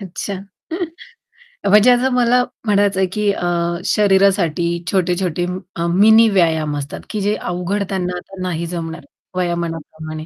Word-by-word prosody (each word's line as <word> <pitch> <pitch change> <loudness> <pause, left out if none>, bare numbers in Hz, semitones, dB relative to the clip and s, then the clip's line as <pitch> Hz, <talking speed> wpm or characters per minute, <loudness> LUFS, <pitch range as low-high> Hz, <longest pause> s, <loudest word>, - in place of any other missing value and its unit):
अच्छा. 195 +1 -5 1.4
म्हणजे 215 +4 +6
आता 250 +2 +3
मला 250 0 +3 0.2
म्हणायचंय 200 -2 +2
की 210 -1 +1
अ, 175 -3 -2 0.4
शरीरासाठी 190 -5 +3 0.2
छोटे-छोटे 180 -2 0 0.3
अ, 170 0 -1
मिनी 220 +6 +6
व्यायाम 160 -6 +1
असतात 140 0 -6
की 215 - -3
जे 205 +2 +1
अवघड 180 +3 -2
त्यांना 180 -2 -2 0.2
नाही 170 -2 -2
जमणार 165 -1 -6 0.3
वयोमानाप्रमाणे 165 -3 -4
185 Hz, 115 wpm, -19 LUFS, 170-205 Hz, 1.4 s, म्हणजे